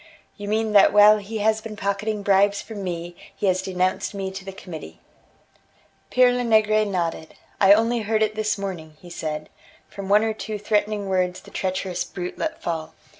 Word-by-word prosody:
"You 205 -1 -8
mean 220 +1 0
that 200 - +7
while 210 +1 +7
he 210 +2 -6
has 220 0 +2
been 220 -1 -7
pocketing 205 +1 -2
bribes 200 0 +3
from 210 -3 -7
me, 175 -1 -5 0.2
he - - -3
has 185 -1 +2
denounced 185 +1 -1
me 190 -1 -3
to 190 0 -8
the 195 - -7
Committee." 180 -4 -10 1.1
Pere 250 -1 +5
Lenegre 215 -3 +3
nodded: 170 -5 -3 0.2
"I 195 0 +7
only 230 +3 +2
heard 220 0 +1
it 215 0 0
this 215 -1 -1
morning," 170 -6 -6
he 175 - -13
said, 155 -2 -4 0.4
"from 195 -1 -8
one 210 +2 +5
or 220 0 0
two 215 0 -5
threatening 205 0 0
words 185 -1 0
the - - -16
treacherous 185 -1 -2
brute 180 -1 -7
let 320 0 -3
fall. 160 -1 -4
200 Hz, 180 wpm, -23 LUFS, 185-215 Hz, 1.1 s, that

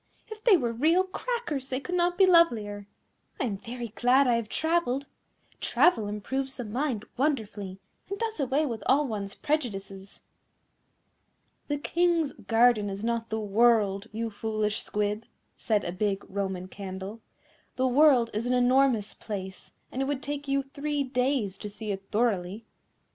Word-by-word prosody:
if 435 -1 -9
they 430 -6 +7
were 240 -6 -1
real 320 +10 +3
Crackers 375 - -3
they 255 - -1
could 355 +6 -6
not 350 0 +1
be 390 - +7
lovelier. 225 - +3 0.5
I - - 0
am 215 -5 -2
very 240 +2 -6
glad 245 +6 +3
I 245 - +3
have 230 -2 -1
travelled. 320 -5 0 0.5
Travel 225 - +3
improves 265 +6 -3
the 250 - -3
mind 235 -1 -2
wonderfully, 215 -9 -1 0.3
and 400 - -3
does 450 -4 -3
away 280 +3 +1
with 230 -6 -4
all 285 +3 +4
one's 200 -5 -4
prejudices." 200 -10 -3 1.5
"The 290 - -1
King's 335 0 +1
garden 225 -2 +3
is 195 +1 -5
not 230 0 -1
the 220 - -1
world, 210 -1 +3
you 225 +1 -3
foolish 215 0 -2
Squib," 210 +1 -1 0.3
said 210 -3 0
a - - -2
big 195 +2 -1
Roman 190 -2 -3
Candle; 195 +3 -7 0.5
"the 260 - +1
world 255 -3 +5
is 220 +3 -2
an 250 - +1
enormous 250 -3 +3
place, 190 -3 -7 0.2
and 260 - -3
it - - +1
would 280 -1 -2
take 290 0 -4
you 275 0 +1
three 285 +1 -2
days 250 -6 0
to 210 - -5
see 210 +1 -5
it 195 0 -6
thoroughly." 210 -2 0
235 Hz, 160 wpm, -28 LUFS, 205-280 Hz, 1.5 s, they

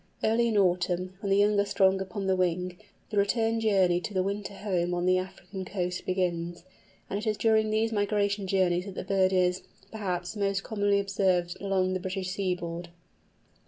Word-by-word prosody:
Early 230 +2 +3
in 220 -2 +1
autumn, 180 -1 +1
when 200 - -3
the 195 - +4
young 205 0 +4
are 200 - +3
strong 190 -1 +3
upon 195 +1 -4
the 190 0 +2
wing, 180 0 0 0.4
the 210 - -2
return 225 +2 +1
journey 190 -5 +3
to 205 - -6
the 185 - +2
winter 200 +1 -4
home 180 -4 -1
on 175 0 -1
the 185 0 +4
African 190 +1 -7
coast 180 -1 -3
begins, 175 -2 -1 0.4
and 200 - -2
it 220 - -5
is 215 -1 +1
during 220 +1 +3
these 220 +1 +1
migration 205 -1 0
journeys 180 -2 +2
that 195 - -8
the - - -4
bird 190 0 +2
is, 180 0 +2 0.3
perhaps, 180 -4 -3
most 200 -1 0
commonly 205 -2 +1
observed 190 -3 +1
along 190 -2 +1
the 185 - -1
British 185 0 -3
seaboard. 175 -3 -3
190 Hz, 185 wpm, -28 LUFS, 180-205 Hz, 0.4 s, the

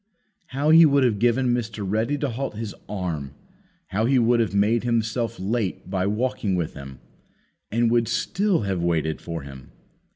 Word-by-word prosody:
How 145 +3 0
He 165 +1 +9
would 140 -3 +4
have 115 -5 +1
given 120 +2 +2
Mr. 110 -3 -3
Ready 110 +8 0
to 145 -1 -2
halt 130 -1 -4
His 110 -1 -5 0.2
arm; 80 -9 -4 0.5
how 105 +4 0
He 135 +2 +3
would 120 0 +3
have 110 -3 0
made 105 +3 +2
Himself 115 -1 -1
late 100 -2 -2
by 95 -1 0
walking 110 -2 -1
with 85 -3 -2
him, 70 -2 -10 0.7
and 115 +1 +1
would 120 -1 +2
still 195 - 0
have 95 -4 -2
waited 80 -2 0
for 85 -3 -5
him! 70 -1 -11
110 Hz, 170 wpm, -24 LUFS, 95-120 Hz, 0.7 s, He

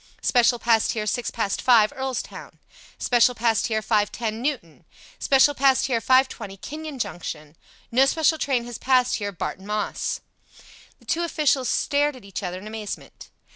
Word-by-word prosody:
"Special 245 -1 +3
passed 230 -1 +2
here 215 -2 -3
six 240 +3 -1
past 205 -4 -2
five. 235 -2 +5
Earlstown." 265 -2 -5 0.4
"Special 245 0 +3
passed 225 -1 +1
here 220 -1 -1
5:10. 215 +1 0
Newton." 230 - -4 0.4
"Special 275 +1 +4
passed 270 -1 +3
here 235 -4 0
5:20. 245 -6 +1
Kenyon 305 +2 -7
Junction." 160 - -6 0.4
"No 260 +3 +4
special 315 +2 +2
train 255 -5 0
has 240 -1 -8
passed 255 -1 +2
here. 205 -2 -3
Barton 190 +1 -6
Moss." 210 0 -2 0.8
The - - -24
two 335 - 0
officials 295 -6 +1
stared 290 -1 +1
at 245 -5 -14
each 200 +1 -6
other 180 -2 -4
in 190 - -10
amazement. 215 -1 -8
240 Hz, 155 wpm, -24 LUFS, 210-265 Hz, 0.8 s, five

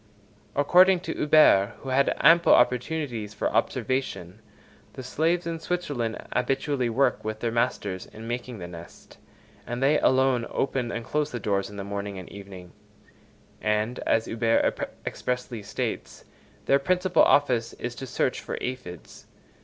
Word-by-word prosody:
According 180 +5 +5
to 190 - -4
Huber, 130 -9 +5
who 135 - -7
had 135 +2 +2
ample 170 0 +6
opportunities 125 -4 0
for - - -1
observation, 110 -8 -2 0.5
the 130 - -8
slaves 165 +7 0
in 165 -1 -3
Switzerland 145 -10 -2 0.2
habitually 135 0 0
work 130 +5 +1
with 110 0 -4
their 115 0 -1
masters 105 -5 -1
in 110 +1 -11
making 120 0 -4
the 90 -3 -7
nest, 85 -1 -13 0.5
and 120 +2 -3
they 145 +3 +4
alone 130 -2 +2
open 130 -3 -1
and 115 -1 -5
close 150 +3 -1
the 120 - -5
doors 100 -2 -1
in 105 - -10
the 100 - -4
morning 100 0 -5
and 95 - -9
evening; 95 -3 -11 0.9
and, 105 +3 0
as 115 0 +2
Huber 115 0 +1 0.3
expressly 125 -2 -3
states, 100 - -5 0.4
their 140 - +4
principal 180 +3 +2
office 125 -5 +3
is 120 0 -5
to 135 +2 -8
search - - -1
for - - -5
aphides. 125 -9 -7
125 Hz, 145 wpm, -26 LUFS, 105-140 Hz, 0.9 s, ample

